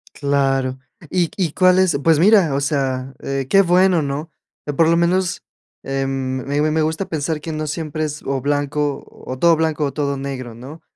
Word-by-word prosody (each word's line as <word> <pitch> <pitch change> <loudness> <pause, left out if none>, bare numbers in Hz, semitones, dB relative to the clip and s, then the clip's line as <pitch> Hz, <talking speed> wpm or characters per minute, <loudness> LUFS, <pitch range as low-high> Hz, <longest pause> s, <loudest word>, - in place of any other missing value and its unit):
Claro. 135 -2 0 0.3
¿Y 175 -4 0
y 175 -6 -1
cuáles? 185 -3 +4
Pues 165 -2 +4
mira, 190 -4 +5
o 140 - 0
sea, 135 -2 -1
eh, 135 -1 -3
qué 195 - +6
bueno, 180 -1 +3
¿no? 145 +3 -4 0.5
Por 165 - +5
lo 165 - +4
menos, 175 +2 +1 0.4
em, 135 0 -2 0.4
me 145 +2 0
me 155 +1 +1
gusta 160 +5 -2
pensar 155 0 -2
que 160 - -5
no 155 0 -3
siempre 155 0 -3
es, 150 -1 -5
o 135 0 -1
blanco 145 +1 -1
o 130 0 -9
todo 170 +1 +5
blanco 160 -1 0
o 140 - -2
todo 140 -1 -1
negro, 135 -3 -6
¿no? 130 +8 -11
150 Hz, 180 wpm, -20 LUFS, 140-165 Hz, 0.5 s, qué